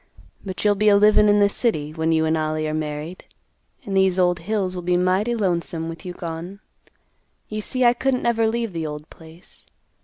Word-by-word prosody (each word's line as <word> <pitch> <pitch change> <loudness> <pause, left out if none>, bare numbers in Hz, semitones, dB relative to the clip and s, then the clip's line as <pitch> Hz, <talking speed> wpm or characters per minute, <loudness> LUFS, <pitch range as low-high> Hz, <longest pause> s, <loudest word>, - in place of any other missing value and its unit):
But 190 0 -6
you'll 205 - +5
be 210 +1 +2
a 200 - +6
livin' 210 0 +5
in 205 0 +4
the 205 - +5
city, 155 -9 -1
when 160 0 -1
you 160 0 +2
and 160 0 +1
Ollie 155 0 -1
are 155 - -3
married, 155 +3 -5 0.6
and 195 - -3
these 190 -1 +3
old 180 -1 +2
hills 190 +1 -2
will 180 - -5
be 175 0 +1
mighty 190 +6 +1
lonesome 170 -5 -2
with 165 +3 -9
you 180 - -5
gone. 175 +3 -7 0.9
You 215 0 -4
see 255 +3 0
I 240 - +6
couldn't 260 +1 -1
never 230 -1 +2
leave 230 -2 -2
the 165 -2 -3
old 150 +1 -7
place. 160 +1 -15
185 Hz, 205 wpm, -22 LUFS, 160-210 Hz, 0.9 s, a